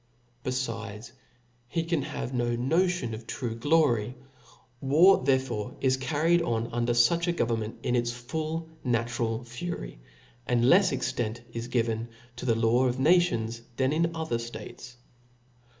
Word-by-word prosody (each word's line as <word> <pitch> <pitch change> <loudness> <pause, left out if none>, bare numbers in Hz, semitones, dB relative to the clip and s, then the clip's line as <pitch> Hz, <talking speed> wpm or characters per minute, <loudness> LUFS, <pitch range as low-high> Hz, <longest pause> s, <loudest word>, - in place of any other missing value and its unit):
Befides, 115 -3 -4 0.6
he 165 +7 -1
can 165 -2 0
have 130 -1 -5
no. 120 -1 0
notion 165 +1 +1
of 115 +1 -8
true 120 -3 -3
glory. 120 -3 +2 0.7
War 155 +6 +5
therefore 130 -5 0
is 130 -1 +2
carried 160 +6 +2
on 115 -6 -1
under 120 0 +1
fuch 165 +9 +3
a - - +3
government 115 -8 -1
in 125 - +1
its 120 -1 +1
full 155 +7 -4 0.2
na 120 -2 +1
tural 120 0 -2
fury, 120 - -6 0.5
and 120 -1 +2
lefs 180 +8 +5
extent 120 -3 -2
is 115 0 -4
given 115 -1 -1 0.3
to 125 - -5
the 115 - +3
law 115 +3 +3
of 125 0 -1
nations 130 -7 +2 0.2
than 130 +2 +2
in 165 +1 +1
other 160 -8 -2
ftates. 115 +1 -8
125 Hz, 145 wpm, -28 LUFS, 115-155 Hz, 0.7 s, War